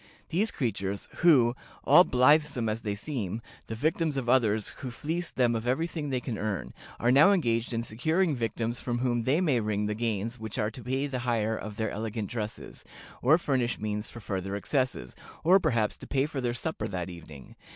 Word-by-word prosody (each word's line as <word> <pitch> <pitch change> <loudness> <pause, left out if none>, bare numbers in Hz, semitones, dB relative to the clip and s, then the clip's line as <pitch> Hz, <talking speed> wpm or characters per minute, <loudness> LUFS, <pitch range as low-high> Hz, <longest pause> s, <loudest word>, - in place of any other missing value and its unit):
These 195 +7 +1
creatures, 100 - -3
who, 130 -8 +5 0.3
all 175 - +8
blithesome 140 -2 +3
as 110 +1 -2
they 105 -1 -2
seem, 110 - -4 0.3
the 110 - -4
victims 155 +3 0
of 130 -3 -2
others 110 -4 +3
who 130 - -5
fleece 165 +7 -3
them 120 -2 +2
of 115 +1 -3
every 135 +7 +1
thing 160 -4 -4
they 130 -2 0
can 120 -4 -5
earn, 105 -2 -3 0.3
are 120 - +3
now 145 +9 +7
engaged 120 - +1
in 115 -1 -1
securing 160 - +1
victims 115 0 -2
from 120 -1 -2
whom 120 -2 0
they 145 +7 +2
may 145 -9 +2
wring 105 -1 -1
the 105 - -1
gains 115 +1 -2
which 110 -2 -6
are 105 +1 0
to 125 - -10
pay 130 +4 -1
the 135 -3 -3
hire 115 -3 0
of 110 -1 -6
their 110 -2 -1
elegant 110 -1 -4
dresses, 110 -3 -5 0.4
or 145 +6 +5
furnish 130 -7 0
means 105 0 -3
for 120 - -10
further 95 -1 -3
excesses, 120 - -1 0.3
or 185 +4 +6
perhaps 115 - +1
to - - -11
pay 135 -1 +1
for 145 -3 -4
their 120 -1 -1
supper 160 +6 -3
that 90 -1 -4
evening. 80 -5 -12
120 Hz, 200 wpm, -28 LUFS, 110-140 Hz, 0.4 s, all